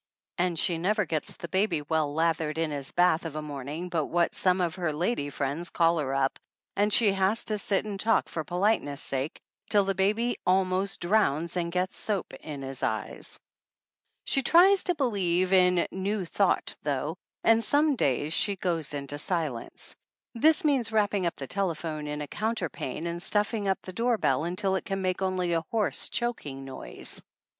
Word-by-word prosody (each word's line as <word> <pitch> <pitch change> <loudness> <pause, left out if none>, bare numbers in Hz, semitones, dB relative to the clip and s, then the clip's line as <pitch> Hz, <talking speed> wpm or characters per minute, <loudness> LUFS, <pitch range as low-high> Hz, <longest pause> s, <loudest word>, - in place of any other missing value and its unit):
And 175 -1 +1
she 165 +2 +1
never 210 +4 +1
gets 155 -3 -3
the 170 - -6
baby 185 -3 0
well 155 -1 0
lathered 160 0 0
in 165 -1 0
his 140 -2 -4
bath 175 -2 +3
of 165 -3 -6
a 155 - -2
morning 145 +4 -5
but 165 -4 -1
what 175 0 +1
some 185 0 +2
of 175 -3 0
her 175 -4 -1
lady 155 0 -1
friends 145 +5 -3
call 165 -1 +2
her 135 -2 -1
up 135 0 0 0.4
and 205 +1 +2
she 210 -1 +5
has 195 +3 +1
to 215 -1 0
sit 200 0 +1
and 205 -2 -5
talk 225 +2 +2
for 160 - -4
polite 190 +7 +2
ness' 145 -1 -5
sake 135 +3 -3 0.3
till 205 -2 +4
the 195 - +1
baby 210 +6 +1
almost 185 +1 +1
drowns 175 -4 +1
and 170 -1 -1
gets 180 +1 -1
soap 205 -4 -2
in 145 -3 -7
his 135 -1 -5
eyes. 110 -1 -3 0.9
She 270 - +2
tries 370 +8 +6
to 355 - +1
believe 190 - +1
in 180 -1 +4
New 190 +1 -2
Thought - - +1
though, - - -2 0.3
and 225 0 +4
some 290 +5 +3
days 145 - 0
she 200 +2 +2
"goes 165 -6 -2
into 140 0 -4
the 145 - -3
silence." 155 -8 -2 0.4
This 315 +8 +4
means 265 -7 +2
wrapping 205 -4 +2
the 135 - -6
telephone 160 -3 -2
up - - -4
in 150 - -4
a - - -7
counter 215 -1 -2
pane 135 +5 -5
and 170 0 -3
stuffing 210 +2 0
up 190 - +1
the 185 - -8
door 235 +3 +1
bell 150 -5 +1
until 190 +3 0
it 190 - -3
can 195 -1 -3
make 185 0 -1
only 185 -2 0
a 165 - +1
hoarse, 220 -2 0
choking 150 - -3
noise. 130 - -3
180 Hz, 190 wpm, -28 LUFS, 155-205 Hz, 0.9 s, tries